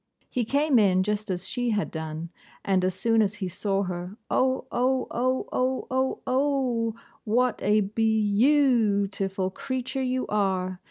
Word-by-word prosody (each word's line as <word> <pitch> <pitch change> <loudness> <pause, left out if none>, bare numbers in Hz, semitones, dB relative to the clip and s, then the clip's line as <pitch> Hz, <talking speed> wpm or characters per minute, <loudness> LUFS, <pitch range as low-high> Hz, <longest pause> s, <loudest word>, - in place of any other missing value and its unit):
He 245 -2 0
came 280 +1 +3
in 185 -3 +4
just 210 +1 -2
as 180 -1 -3
she 245 -1 -1
had 210 -2 -1
done; 160 +1 -5 0.3
and 190 -2 +2
as 185 0 0
soon 225 -1 +2
as 205 -1 0
he 195 -3 -4
saw 195 +2 -1
her, 180 +2 -5
'O! 260 0 +1
O! 255 +1 +1
O! 255 +2 0
O! 255 +1 -1
O! 260 0 0
O! 255 -4 0 0.3
what 240 +2 +1
a 210 +2 +3
beyou 215 +2 +2
oo 235 -9 +3
ootiful 195 -1 -3
creature 260 +2 -3
you 255 0 -1
are! 185 -3 -1
220 Hz, 160 wpm, -26 LUFS, 195-255 Hz, 0.3 s, in